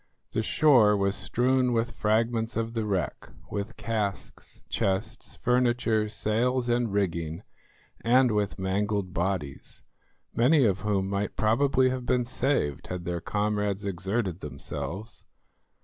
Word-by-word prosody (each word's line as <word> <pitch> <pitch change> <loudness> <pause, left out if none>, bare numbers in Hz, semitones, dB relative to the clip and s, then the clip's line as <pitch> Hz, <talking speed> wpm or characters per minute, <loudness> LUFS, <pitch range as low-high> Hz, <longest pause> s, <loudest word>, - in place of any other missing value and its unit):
The - - 0
shore 110 -5 +4
was 100 0 +1
strewn 125 +3 +1
with 115 +1 0
fragments 115 +2 0
of 115 0 -2
the 110 -2 -2
wreck, 95 -8 -2 0.2
with 105 +2 -4
casks, 105 -5 -4
chests, 95 -1 -2
furniture, 120 -3 +1
sails 120 +4 +1
and 120 -2 +1
rigging, 85 -3 -1 0.6
and 125 +1 +4
with 105 -1 -1
mangled 100 0 -1
bodies, 85 -6 -3 0.5
many 135 +3 +4
of 95 -2 +1
whom 100 -2 0
might 100 +1 -2
probably 130 +4 +3
have 130 -1 -4
been 125 -1 +2
saved 120 - -1
had 90 -1 -5
their 85 -1 -2
comrades 105 -1 -1
exerted 95 0 -2
themselves. 75 - -6
105 Hz, 125 wpm, -27 LUFS, 95-120 Hz, 0.6 s, shore